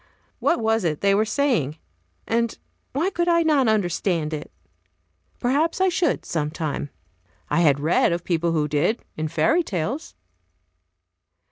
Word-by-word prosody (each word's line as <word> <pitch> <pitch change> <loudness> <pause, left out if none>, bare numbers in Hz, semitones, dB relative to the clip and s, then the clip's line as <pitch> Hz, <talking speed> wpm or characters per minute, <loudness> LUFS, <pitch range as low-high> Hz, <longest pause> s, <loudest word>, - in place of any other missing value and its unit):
What 340 - +2
was 225 -1 +1
it 155 -4 -1
they 200 0 +4
were 210 +2 +3
saying? 220 - 0 0.5
and 230 0 0 0.3
why 325 +9 0
could 345 -2 -1
not 320 -6 +3
I - - +5
understand 175 -5 0
it? 150 -1 -6 0.9
Perhaps 290 +8 +1
I 380 0 +4
should, 345 -3 0
sometime. 150 -2 -3 0.6
I - - +3
had 145 -4 +4
read 155 +4 +2
of 170 0 -2
people 170 -1 0
who 155 -2 +1
did, 155 +10 0
in 155 0 -2
fairy 315 - +2
tales. 230 - -4
200 Hz, 140 wpm, -23 LUFS, -, 0.9 s, I